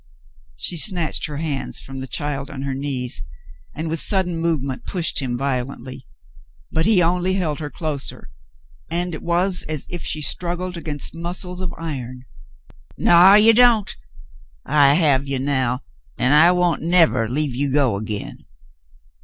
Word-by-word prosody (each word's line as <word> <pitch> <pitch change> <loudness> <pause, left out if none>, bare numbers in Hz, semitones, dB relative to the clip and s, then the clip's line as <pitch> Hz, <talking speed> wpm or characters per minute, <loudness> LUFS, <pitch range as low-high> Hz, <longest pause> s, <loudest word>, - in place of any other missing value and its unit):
She 170 - -1
snatched 175 -4 +1
her 150 -2 -6
hands 150 -3 -3
from 135 0 -9
the 130 - -5
child 140 +2 -4
on 135 -3 -7
her 135 -1 -3
knees, 130 - -3 0.5
and, 160 +2 -4
with 160 +1 -2
sudden 185 -2 0
movement, 145 -6 -1
pushed 175 -5 0
him 125 -2 -2
violently; 130 -1 -4 0.6
but 160 +4 +1
he 200 -5 +5
only 180 +2 +1
held 160 -6 -2
her 150 -2 -5
closer, 150 - -5 0.6
and 175 +1 -2
it 155 - -6
was 180 +2 +1
as 155 -3 -3
if 175 -2 -4
she 155 - -2
struggled 180 +3 -2
against 150 -4 -5
mus 170 +3 -3
cles 180 0 -7
of 185 -2 -3
iron. 130 -6 -6 0.7
"Naw, 180 +3 +7
you 220 +2 +6
don't! 230 -3 +4 0.7
I 140 -1 +4
have 140 -5 +2
you 135 -1 -2
now, 130 -2 0 0.3
an' 125 - +1
I 155 +4 +7
won't 180 -2 +1
nevah 165 -8 +3
leave 145 +1 -1
you 140 +2 -1
go 135 -6 +2
again." 105 -7 -6
155 Hz, 155 wpm, -21 LUFS, 135-175 Hz, 0.7 s, Naw